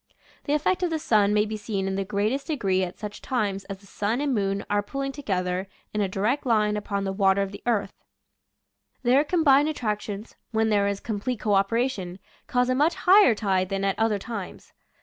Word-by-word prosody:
The 290 - 0
effect 355 +5 +1
of 360 - +1
the 325 - -1
sun 210 -8 +3
may 210 0 +3
be 215 0 -4
seen 205 -2 -3
in 195 - -1
the 195 0 -1
greatest 210 +8 -1
degree 195 - 0
at 180 -1 -4
such 210 -1 -7
times 205 -6 -2
as 195 -1 -6
the 200 - -21
sun 210 +4 -2
and 285 -2 0
moon 195 -2 -1
are 205 0 +1
pulling 275 +6 -4
together 185 -8 -2 0.3
in 210 - 0
a 195 - 0
direct 215 +9 0
line 215 -4 +2
upon 200 -1 -2
the 195 -1 -2
water 195 0 +3
of 195 - -5
the 200 - -10
ocean. 210 -4 +1 1.1
Their 260 +4 +4
com 325 +1 0
bined 285 +2 +5
attractions, 210 -6 -4
when 220 0 +1
there 205 -2 +2
is 200 -1 -2
complete 225 +2 -3
co 210 - 0
operation, 195 -2 0 0.3
cause 250 0 +1
a 255 - +2
much 295 +6 +2
higher 375 - +6
tide 190 -3 0
than 195 0 -2
at 195 +1 -1
other 220 -2 +2
times. 205 -2 -7
210 Hz, 210 wpm, -25 LUFS, 195-255 Hz, 1.1 s, higher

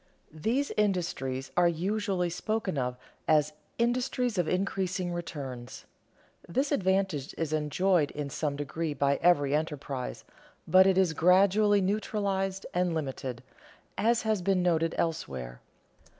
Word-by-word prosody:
_ 155 - -12
These 260 - 0
industries 170 -10 -1
are 175 0 +5
usually 185 +1 -1
spoken 215 0 -2
of 125 -2 -2 0.3
as 150 -1 +3 0.2
"industries 245 -2 0
of 175 - +1
increasing 185 -1 -1
returns." 135 -8 -6 0.6
This 270 - 0
advantage 190 - 0
is 160 -2 -2
enjoyed 155 +1 +2
in 145 -2 -5
some 145 -1 -2
degree 145 +2 -3
by 140 0 +2
every 145 -5 +4
enterprise, 145 -4 -3 0.4
but 185 +3 +6
it 190 -1 +3
is 185 -4 +3
gradually 200 +5 +4
neutralized 195 -1 -1
and 180 -1 +1
limited 130 -5 -4 0.5
(as 230 +3 +2
has 215 -3 0
been 185 0 +1
noted 165 -2 +1
elsewhere). 65 - -3
175 Hz, 125 wpm, -29 LUFS, 150-195 Hz, 0.6 s, but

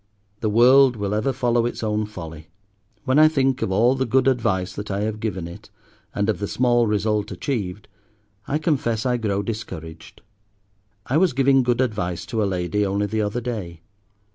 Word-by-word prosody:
the 110 - -1
world 125 +4 +6
will 100 -2 -3
ever 110 +6 0
follow 120 -2 +1
its 120 - -6
own 105 0 -1
folly. 80 -6 -9 0.6
When 130 +3 +3
I 155 - +8
think 135 -3 +1
of - - -1
all 115 +6 +4
the 130 0 -1
good 130 +3 +2
advice 95 -8 0
that 105 +1 -7
I 100 0 -2
have 110 0 -2
given 95 -6 -3
it, 85 - -12 0.5
and 100 0 0
of 110 - 0
the 100 - -2
small 120 0 +2
result 105 0 0
achieved, 100 -2 -4 0.6
I 145 - 0
confess 130 -8 -1
I 125 -1 +1
grow 100 -3 -1
discouraged. 85 -7 -7 0.8
I 135 - +1
was 180 -2 +3
giving 135 0 +4
good 125 0 +1
advice 105 -8 -2
to 115 -3 -2
a - - +2
lady 95 +3 -1
only 100 +1 0
the 110 +2 -1
other 105 +3 -2
day. 100 -9 -5
110 Hz, 185 wpm, -22 LUFS, 100-125 Hz, 0.8 s, I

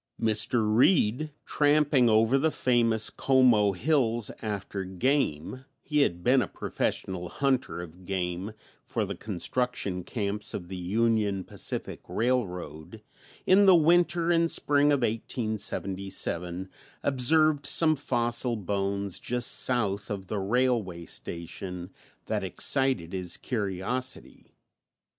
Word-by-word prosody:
Mr. 110 0 +1
Reed, 135 - +3
tramping 145 -4 +3
over 110 +5 +3
the 160 - +2
famous 115 -6 +2
Como 125 -7 +3
hills 120 - +1
after 100 -2 -4
game 95 - -1 0.2
he 150 -1 0
had 85 -10 0
been 130 +1 +4
a - - -2
professional 90 -2 -4
hunter 130 -9 -1
of 90 +2 -13
game 90 +2 -3 0.3
for 110 -3 -2
the 100 - -5
construction 100 0 -2
camps 105 -1 -3
of 90 -2 -7
the 95 - -6
Union 100 +1 0
Pacific - - -5
Railroad 105 - -3 0.4
in 195 +2 +5
the 190 - +8
winter 170 +1 +3
and 165 -1 +2
spring 145 -1 +3
of 140 -2 +1
1877, 100 -6 -1 0.4
observed 145 +2 +3
some 155 +2 +4
fossil 120 -3 0
bones 100 -1 -2
just 120 0 0
south 105 -5 +1
of 100 -2 -5
the 105 +2 -3
railway 105 -5 0
station 90 +2 -7 0.3
that - - -2
excited 130 -12 +1
his 90 -2 -1
curiosity. 115 +3 -4
110 Hz, 115 wpm, -27 LUFS, 95-130 Hz, 0.4 s, the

